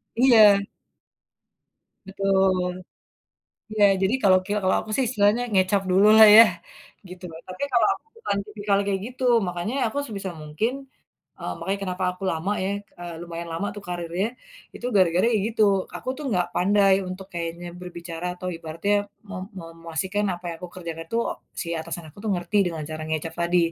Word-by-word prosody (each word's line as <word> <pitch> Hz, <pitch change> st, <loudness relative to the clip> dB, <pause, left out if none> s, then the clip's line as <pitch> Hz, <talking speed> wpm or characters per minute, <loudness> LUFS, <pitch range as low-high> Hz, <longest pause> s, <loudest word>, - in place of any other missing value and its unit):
Iya. 220 Hz, -5 st, +7 dB, 1.5 s
Betul. 190 Hz, -2 st, +1 dB, 1.0 s
Iya, 215 Hz, -1 st, +2 dB, 0.2 s
jadi 195 Hz, +4 st, +2 dB
kalo 190 Hz, -2 st, +6 dB
kel 205 Hz, +2 st, -1 dB
kalo 185 Hz, -, +3 dB
aku -, -, -8 dB
sih 270 Hz, -, +2 dB
istilahnya 215 Hz, +1 st, +2 dB
ngecap 190 Hz, 0 st, +3 dB
dulu 195 Hz, +3 st, +5 dB
lah 220 Hz, 0 st, +10 dB
ya? 225 Hz, -, +12 dB, 0.7 s
Gitu 180 Hz, 0 st, -11 dB
loh. 160 Hz, -, -10 dB
Tapi, 185 Hz, +7 st, -6 dB
kalo 240 Hz, -2 st, +4 dB
aku -, -, -13 dB
bukan 460 Hz, -, -2 dB
tipikal 210 Hz, -1 st, -1 dB
yang 200 Hz, -, -2 dB
kayak 195 Hz, -1 st, -1 dB
gitu. 255 Hz, +1 st, -8 dB, 0.2 s
Makanya 175 Hz, +5 st, -3 dB
aku 225 Hz, -, -5 dB
sebisa 200 Hz, -6 st, -5 dB
mungkin 155 Hz, +10 st, -1 dB, 0.7 s
eee, -, -, -4 dB
makanya 195 Hz, +1 st, -2 dB
kenapa 185 Hz, -1 st, -3 dB
aku 180 Hz, +2 st, -11 dB
lama 165 Hz, +5 st, -2 dB
ya 190 Hz, -, -1 dB, 0.3 s
eee, 175 Hz, -1 st, -6 dB
lumayan 170 Hz, 0 st, -6 dB
lama 170 Hz, +5 st, -2 dB
tuh 205 Hz, -, -8 dB
karirnya, 175 Hz, +2 st, -2 dB, 0.5 s
itu -, -, -7 dB
gara-gara 180 Hz, -1 st, +4 dB
ya -, -, +3 dB
gitu, 225 Hz, -1 st, -2 dB, 0.3 s
aku -, -, -5 dB
tuh 300 Hz, -, -7 dB
nggak 180 Hz, -3 st, +2 dB
pandai 195 Hz, +1 st, +4 dB
untuk 185 Hz, +1 st, -7 dB
kayaknya 170 Hz, 0 st, -4 dB
berbicara 170 Hz, -1 st, -7 dB
atau 185 Hz, -, -5 dB
ibaratnya 165 Hz, +5 st, -2 dB, 0.4 s
me 205 Hz, -, -6 dB, 0.2 s
me -, -, -9 dB, 0.2 s
memastikan 185 Hz, +5 st, -2 dB
apa 175 Hz, 0 st, -9 dB
yang 165 Hz, -, -5 dB
aku 180 Hz, -, -8 dB
kerjakan 165 Hz, -2 st, -6 dB
tuh 230 Hz, +1 st, +1 dB, 0.4 s
si -, -, -6 dB
atasan 165 Hz, +1 st, -6 dB
aku 155 Hz, -, -17 dB
tuh 215 Hz, -, 0 dB
ngerti 180 Hz, +3 st, -1 dB
dengan 165 Hz, -3 st, -3 dB
cara 155 Hz, 0 st, -5 dB
ngecap 160 Hz, +1 st, -3 dB
tadi. 175 Hz, +1 st, +2 dB
185 Hz, 175 wpm, -24 LUFS, 170-205 Hz, 1.5 s, ya